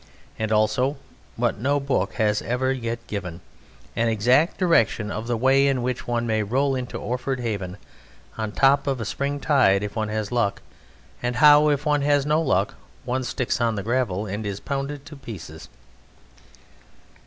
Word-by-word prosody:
And 110 0 -2
also 110 +6 +2 0.4
what - - -1
no 140 +5 +1
book 140 -1 -1
has 105 -2 +1
ever 130 +2 0
yet 115 -2 -4
given, 90 -6 -5 0.6
an 115 - +1
exact 125 - +3
direction 115 - +2
of 110 +1 -4
the 120 -1 0
way 135 +3 +4
in 130 -3 +1
which 125 0 -3
one 120 -1 0
may 110 -2 +1
roll 135 +7 +1
into 125 -2 -4
Orford 125 +2 -3
Haven, 100 -6 -4 0.6
on 110 -1 -3
the - - -13
top 140 +1 +4
of 135 -2 0
a 110 - -3
spring 140 +6 -2
tide 125 -10 +3
if 105 - -5
one 110 -1 -1
has 110 -1 -3
luck, 120 -5 0 0.6
and 120 0 -1
how 150 +3 +7
if 145 0 0
one 150 -1 +2
has 145 -1 +2
no 150 +2 +2
luck 100 - +1 0.3
one 130 +1 -1
sticks 125 -1 -2
on 115 -1 +1
the 100 - -3
gravel 110 -4 -1
and 105 +2 -4
is 100 -1 -4
pounded 140 +2 -4
to 155 - -10
pieces. 105 - -10
120 Hz, 175 wpm, -24 LUFS, 110-140 Hz, 0.6 s, how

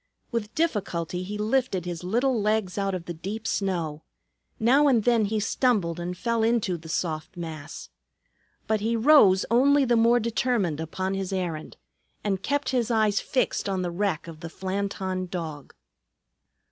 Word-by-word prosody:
With 225 -2 -3
difficulty 185 - -1
he 200 +3 -5
lifted 215 -4 0
his 175 -1 -5
little 240 +5 +1
legs 210 -3 0
out 195 -1 -1
of 175 -2 -6
the 175 - -5
deep 200 +7 -6
snow; 170 -6 -1 0.6
now 270 +6 +5
and 240 -6 +3
then 235 -2 +3
he 215 +1 -1
stumbled 205 -6 +1
and 180 +1 -4
fell 230 -2 0
into 225 -5 +1
the 160 -1 -10
soft 160 +1 -3
mass. 160 -2 -7 0.8
But 220 -1 +1
he 225 +3 0
rose 225 -7 +6
only 275 +4 +5
the 240 -1 +3
more 235 +1 +4
determined 225 - 0
upon 185 +4 -3
his 195 -1 -3
errand, 175 -5 -3 0.5
and 195 -2 -1
kept 285 +1 -1
his 245 -3 0
eyes 215 -3 +2
fixed 255 -5 -1
on 190 -2 -1
the 175 - -2
wreck 185 -3 -1
of 160 -2 -9
the 165 0 -7
Flanton 190 0 -3
Dog. 160 -6 -6
200 Hz, 160 wpm, -26 LUFS, 175-230 Hz, 0.8 s, rose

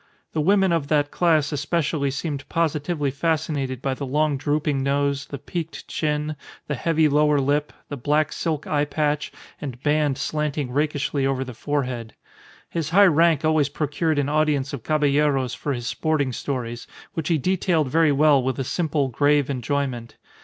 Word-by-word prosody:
The 155 - 0
women 190 +2 +3
of 165 -4 0
that 145 -1 +1
class 160 -5 +2
especially 145 -1 0
seemed 140 0 -4
positively 155 -2 0
fascinated 140 -4 -1
by 135 - 0
the 135 - -6
long 150 +2 +1
drooping 145 0 0
nose, 140 0 0
the 140 - -6
peaked 165 +2 -6
chin, 150 0 -1 0.3
the 150 - -3
heavy 160 +2 +2
lower 150 0 +3
lip, 145 +2 0 0.2
the 145 - -5
black 150 +4 +1
silk 155 -3 -2
eyepatch 150 0 0 0.3
and 130 -4 -6
band 150 -2 +2
slanting 150 -4 -2
rakishly 145 -1 0
over 135 -1 0
the 130 -1 -8
forehead. 125 -3 -3 0.5
His 165 -3 -3
high 200 +4 +6
rank 165 -3 +4
always 155 -3 +3
procured 150 +2 -1
an 145 -1 +1
audience 150 -2 +1
of 140 - -4
Caballeros 145 -3 +2
for 145 - -3
his 120 -3 -3
sporting 145 -2 0
stories, 120 -3 -4 0.3
which 160 -5 -3
he 165 - +2
detailed 170 -2 +1
very 160 -1 +4
well 145 -1 +4
with 130 0 -2
a 135 - -1
simple, 150 0 0
grave 145 +2 +2
enjoyment. 130 -2 -3
145 Hz, 160 wpm, -23 LUFS, 140-155 Hz, 0.5 s, high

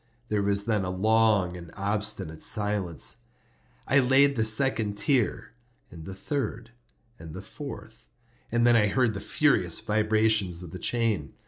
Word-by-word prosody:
There 105 -1 0
was 100 0 0
then 110 -4 0
a 90 - -3
long 105 -1 +2
and 85 -2 -10
obstinate 100 -5 -2
silence. 105 -7 -1 0.7
I 140 - +4
laid 135 +2 +4
the 110 - +1
second 110 -2 +1
tier, 125 0 0 0.4
and 80 -2 -11
the 95 - -8
third, 115 -2 -4 0.5
and 80 0 -10
the 95 - -7
fourth; 110 -3 -10 0.4
and 120 +1 +2
then 120 -1 +5
I 105 -2 +4
heard 125 +1 +1
the 100 - -5
furious - - +1
vibrations 110 -4 +1
of 85 - -9
the 95 - -8
chain. 110 - -1
105 Hz, 150 wpm, -26 LUFS, 95-115 Hz, 0.7 s, then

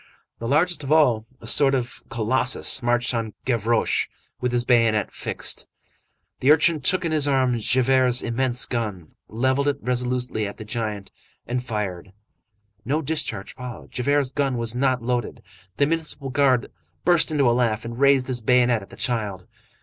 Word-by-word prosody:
The 115 - -4
largest 160 +5 +2
of 135 - -5
all, 125 -8 +3
a - - -11
sort 135 -2 +5
of 125 -2 -4
colossus, 125 +1 +1
marched 120 +1 +1
on 115 -2 -3
Gavroche 115 -2 +1 0.3
with 125 -1 -1
his 120 0 0
bayonet 115 -4 +2
fixed. - - -4 0.7
The 135 - +4
urchin 155 0 +4
took 185 +7 +1
in 165 - -1
his 150 -2 +3
arms 130 -4 +1
Javert's 130 -1 +3
immense 125 +1 +1
gun, 105 - -4 0.2
levelled 130 +5 0
it 145 -1 +1
resolutely 125 -3 -1
at 100 - -9
the 110 - -9
giant, 105 -3 -4 0.3
and 125 +1 -3
fired. 100 -6 -4 0.7
No 150 +6 -1
discharge 150 -9 -2
followed. 125 -2 -9
Javert's 140 +1 0
gun 135 -2 -1
was 115 0 -1
not 130 -1 +1
loaded. 120 -1 -3 0.3
The 140 - +3
municipal 155 -3 -3
guard 130 -3 +2 0.3
burst 175 -1 +4
into 145 -4 +2
a 120 - +4
laugh 115 -3 0
and 115 +1 -6
raised 140 -2 +4
his 125 -2 -3
bayonet 120 -1 +3
at 95 - -13
the - - -12
child. 105 -7 -2
125 Hz, 165 wpm, -23 LUFS, 115-135 Hz, 0.7 s, sort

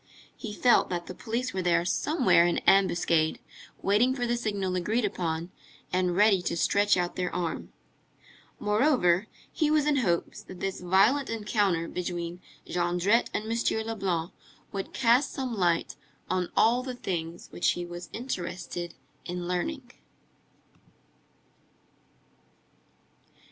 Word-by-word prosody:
He 225 - -7
felt 240 +3 +3
that 175 -1 -3
the - - -7
police 235 +4 -3
were 190 - -1
there 170 -1 +2
somewhere 245 - +3
in 175 - 0
ambuscade, 170 -4 +3 0.5
waiting 230 +6 +3
for 245 -2 -1
the 240 0 +1
signal 200 -5 -2
agreed 215 +6 0
upon 170 -3 -3 0.4
and 180 -1 +1
ready 205 -1 +5
to 175 - -2
stretch 205 +3 +3
out 175 -1 -1
their 180 -1 -1
arm. 175 -2 -3 0.9
Moreover, 210 - +2 0.3
he 310 -2 +1
was 305 -1 +3
in 295 -1 +2
hopes, 175 -10 0
that 185 - -11
this 195 0 -3
violent 200 +10 +3
encounter 205 -6 0
between 175 0 -4 0.2
Jondrette 180 +6 +1
and 210 - -2
M. 230 -1 0
Leblanc 190 -6 -2 0.4
would 195 -1 -5
cast 245 +2 +3
some 255 -3 -3
light 175 -4 +1 0.4
on 180 -1 0
all 235 +3 +4
the 255 -1 -5
things 170 -6 -4
which - - +1
he 175 - -5
was 175 0 -8
interested 180 -6 -5 0.3
in 175 0 -4
learning. 245 - -3
190 Hz, 130 wpm, -28 LUFS, 175-230 Hz, 0.9 s, ready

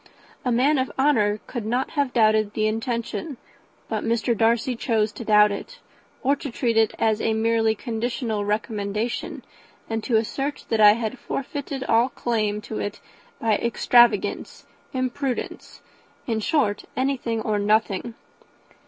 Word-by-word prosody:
A 250 - 0
man 265 +5 +3
of 260 - -1
honour 215 -7 +2
could 240 -4 -5
not 245 +5 -1
have 285 -4 0
doubted 215 -3 +3
the 215 - +1
intention, 235 +6 -3 0.5
but - - -2
Mr. 230 0 +1
Darcy 230 +3 +2
chose 220 -2 0
to 235 - -8
doubt 210 -1 +5
it 480 - -6 0.5
or 275 +2 +3
to 285 - -6
treat 235 -1 -1
it 220 -1 +3
as 220 -1 +1
a 220 - +1
merely 225 0 +2
conditional 230 -1 -2
recommendation, 210 +1 -2 0.4
and 225 -1 -3
to 230 -1 +2
assert 270 +6 -2
that 225 -1 +2
I 210 0 +9
had 230 +3 -4
forfeited 275 0 -4
all 235 +1 +3
claim 215 -5 -1
to 215 - -6
it 205 0 -4 0.4
by 220 -2 +2
extravagance, 235 -2 +2 0.3
imprudence, 255 0 -3 0.4
in 225 -2 -1
short, 215 -4 0
anything 255 -4 -1
or 215 -1 -1
nothing. 215 +2 +1
230 Hz, 145 wpm, -24 LUFS, 215-255 Hz, 0.5 s, I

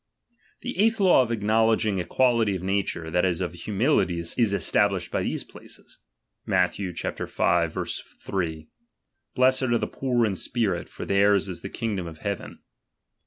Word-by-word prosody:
The 245 -5 -5
eighth 225 +1 +3
law 185 -8 +6
of 120 -2 -1
acknowledging 110 -2 +2
equality 115 +2 +2
^MD^'pride. - - -2
of 90 - -5
nature, 95 -4 -2
that 90 +1 +2
is, 90 -3 +1
of - - -3
humility, 105 - +1
is 85 0 -3 0.2
established 100 -2 +1
by - - 0
these - - -2
places: - - -13 0.4
Matth. 90 -1 +1
v. 100 - -3 1.5
iii: 80 -3 -3 0.7
Blessed 130 +1 +4
are 120 -3 +2
the 110 - -1
poor 125 0 0
I - - +1
in 95 - -3
spirit, 100 -3 -2
for - - -7
theirs 100 0 +3
is 90 -2 -6
the - - -6
kingdom 100 -6 -3
of 80 -1 -9
heaven. 100 +3 -5
100 Hz, 160 wpm, -25 LUFS, 90-120 Hz, 1.5 s, law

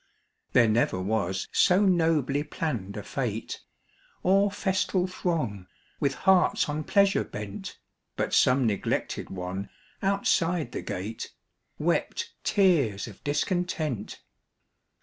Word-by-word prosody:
There 120 -2 +6
never 110 -4 +2
was 95 -1 -1
so 185 +1 +4
nobly 160 -6 +2
planned 120 - -4
a 105 - -5
fête, 115 -4 -3 0.6
Or 195 +2 +4
festal 190 -2 0
throng 155 - -2 0.3
with 140 -2 +1
hearts 185 -2 +4
on 150 +1 -3
pleasure 200 -1 +3
bent, 105 -1 -7 0.4
But - - -2
some 130 0 +4
neglected 105 -4 -1
one 95 +1 -5 0.3
outside 180 -4 +1
the - - -4
gate 105 +5 -5 0.4
Wept - - -1
tears 150 - +2
of 105 - -13
discontent. 150 - -2
145 Hz, 110 wpm, -27 LUFS, -, 0.6 s, There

